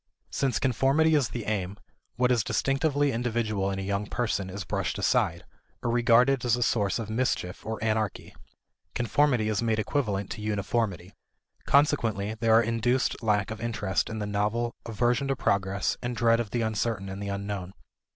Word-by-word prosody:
Since 130 -4 0
conformity 135 +6 +2
is 145 -5 +3
the 120 -4 -5
aim, 100 -2 -2 0.4
what 125 +1 +2
is 120 -4 +2
distinctively 140 +3 +1
individual 115 -4 -1
in 95 - -3
a 95 - -3
young 100 +1 -2
person 105 -5 -2
is 95 +1 -5
brushed - - -2
aside, - - +1 0.4
or 120 - 0
regarded 120 +2 +4
as 120 -2 +3
a 120 - 0
source 105 -4 +1
of 115 -3 -4
mischief 110 -5 -2
or 110 0 -4
anarchy. 110 -2 -1 0.6
Conformity 120 -1 +2
is 110 -1 0
made 115 -2 +1
equivalent 105 -5 -1
to - - -6
uniformity. 105 -2 -2 0.5
Consequently, 115 -8 +2
there 110 0 +3
are 115 - +6
induced 115 +3 0
lack 105 -2 +1
of 110 - -6
interest 105 -5 -1
in 110 - -5
the 105 - -3
novel, 105 +3 -1
aversion 120 +4 +1
to 135 - 0
progress, 100 -4 0
and 120 0 -3
dread 115 -1 +4
of 115 -3 -2
the 120 +3 -1
uncertain 110 -2 -1
and 95 +1 -6
the 100 - -4
unknown. 100 -2 -4
110 Hz, 170 wpm, -27 LUFS, 100-120 Hz, 0.6 s, are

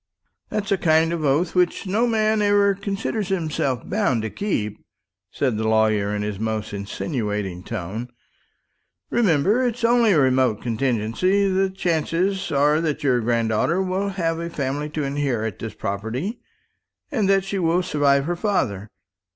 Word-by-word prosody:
"That's 205 -2 -3
a 195 - +2
kind 160 0 +3
of 165 -2 -3
oath 150 +5 +1
which 180 +1 +1
no 215 +6 +1
man 220 -1 +2
ever 205 -1 +4
considers 200 +1 -3
himself 155 - -1
bound 180 - 0
to 110 - -3
keep," 105 - -3 0.5
said 130 -6 -1
the 110 0 -1
lawyer 110 -2 +2
in 105 - -2
his 105 -2 -4
most 110 -1 -3
insinuating 100 - -3
tone. 110 +4 -5 1.0
"Remember, 200 - +3
it's 245 -2 -1
only 230 -2 +4
a 160 - +4
remote 130 -4 +2
contingency. 125 - +1
The 190 0 +1
chances 185 +2 -1
are 150 +2 +3
that 155 -2 -2
your 130 -3 +3
granddaughter 115 - +1
will 190 +1 -1
have 165 -4 -1
a 170 0 -4
family 145 -1 -3
to 150 0 -3
inherit 135 -7 -2
this 110 -2 -6
property, 115 - -4 0.7
and 215 -9 +1
that 195 -1 +4
she 195 0 -3
will 175 +1 +2
survive 140 -4 +2
her 175 +2 -1
father. 120 - -1
155 Hz, 150 wpm, -23 LUFS, -, 1.0 s, ever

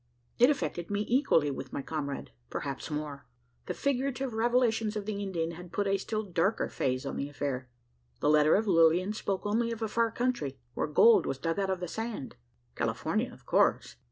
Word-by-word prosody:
It 245 +3 +7
affected 175 - -1
me 205 +1 -1
equally 230 - +3
with 135 -1 -6
my 140 - -4
comrade 140 - -4 0.2
perhaps 140 +2 -4
more. 150 -3 -5 0.4
The - - -3
figurative 270 -2 -1
revelations 225 -2 +2
of 210 -2 -3
the 205 -1 -3
Indian 170 -4 -2
had 175 +1 -10
put 205 +3 0
a 195 0 +2
still 215 +2 -2
darker 190 +2 0
phase 130 -1 -1
on - - -4
the 140 - -3
affair. 135 -3 -3 0.5
The - - 0
letter 155 0 +5
of 215 - +2
Lilian 175 +1 +4
spoke 200 -2 -3
only 230 +3 +1
of 230 -1 -4
a - - 0
far 230 +2 +1
country, 225 - -1 0.2
where - - -1
gold 220 +10 +6
was 135 - -2
dug 165 +6 -1
out 195 -1 0
of 190 -1 -1
the 180 - -2
sand. 220 - -5 0.4
California, - - -1
of - - -16
course. - - +2
195 Hz, 190 wpm, -30 LUFS, 150-225 Hz, 0.5 s, It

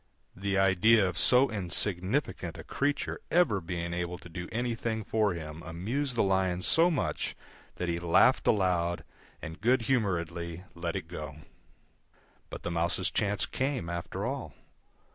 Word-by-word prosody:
The 100 +1 -1
idea 95 +2 +5
of 90 -1 -3
so 130 +2 +5
insignificant 95 - 0
a - - -8
creature 145 +1 -1
ever 160 - +3
being 85 0 -4
able 90 0 -3
to 90 - -13
do 90 +1 -6
anything 115 -1 -2
for 105 -3 +1
him 80 -1 -7
amused 115 - -3
the - - +3
Lion 95 -2 +1
so 165 +2 +5
much 155 -7 -2 0.4
that 90 - -3
he 85 0 -1
laughed 85 -1 +4
aloud, 90 -4 +2 0.4
and 80 +2 -7
good 120 +1 +3
humouredly 85 -8 -1
let 85 -1 -4
it - - -4
go. 75 -4 -7 1.1
But - - -8
the 85 - -3
Mouse's 85 0 0
chance 100 -1 0
came, 130 -11 -2
after 85 -1 -4
all. - - -4
95 Hz, 145 wpm, -30 LUFS, 85-110 Hz, 1.1 s, idea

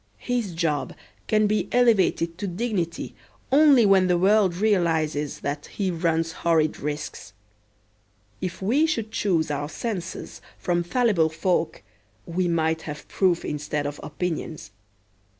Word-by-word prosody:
His 235 -8 -2
job 160 -4 -1 0.3
can 215 0 +3
be 210 +1 0
elevated 200 -8 +3
to 200 - -2
dignity 180 -3 -3 0.4
only 280 -4 +6
when 195 -2 +5
the 180 -1 +3
world 195 0 +3
realizes 165 -8 0
that 145 +1 -4
he 195 -3 -2
runs 165 -1 0
horrid 160 -2 +1
risks. 145 -7 -5 1.1
If 185 +1 -4
we 275 +11 +3
should 225 -9 -2
choose 165 -8 0
our 145 0 -3
censors 185 0 -5 0.2
from 175 -1 0
fallible 180 -3 +2
folk 170 +1 -1 0.4
we 175 +1 -1
might 160 -1 +1
have 150 0 -7
proof 180 -3 +1
instead 150 0 -3
of 145 0 -4
opinions. 155 - -4
175 Hz, 130 wpm, -25 LUFS, 160-205 Hz, 1.1 s, only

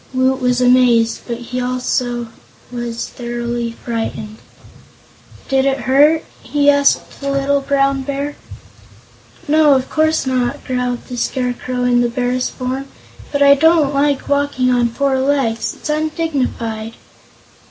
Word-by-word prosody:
Woot 260 +1 +1
was 250 0 +1
amazed, 245 -2 +4
but 235 -1 -3
he 250 +1 -5
was 250 - -1
also 245 -1 -2 0.4
thoroughly 240 0 -4
frightened. 225 -2 -4 1.1
"Did 270 0 +2
it 275 -1 0
hurt?" 295 +5 +3 0.2
he 290 -1 +3
asked 285 0 +1
the 280 - -2
little 275 0 +1
Brown 275 0 +1
Bear. 280 +2 -4 1.1
"No, 300 -1 +5
of 260 0 -2
course 315 -1 +1
not," 260 +2 -1
growled 250 -2 -2
the 250 - -7
Scarecrow 250 0 -2
in 245 -1 +3
the 240 - +1
Bear's 250 +1 -1
form; 260 +2 -4 0.4
"but 285 -1 +2
I 280 0 +8
don't 310 0 +3
like 280 0 +1
walking 285 -3 +1
on 240 -1 +2
four 270 +2 0
legs; 265 -5 0
it's - - -8
undignified." 280 -8 -2
260 Hz, 130 wpm, -17 LUFS, 245-280 Hz, 1.1 s, I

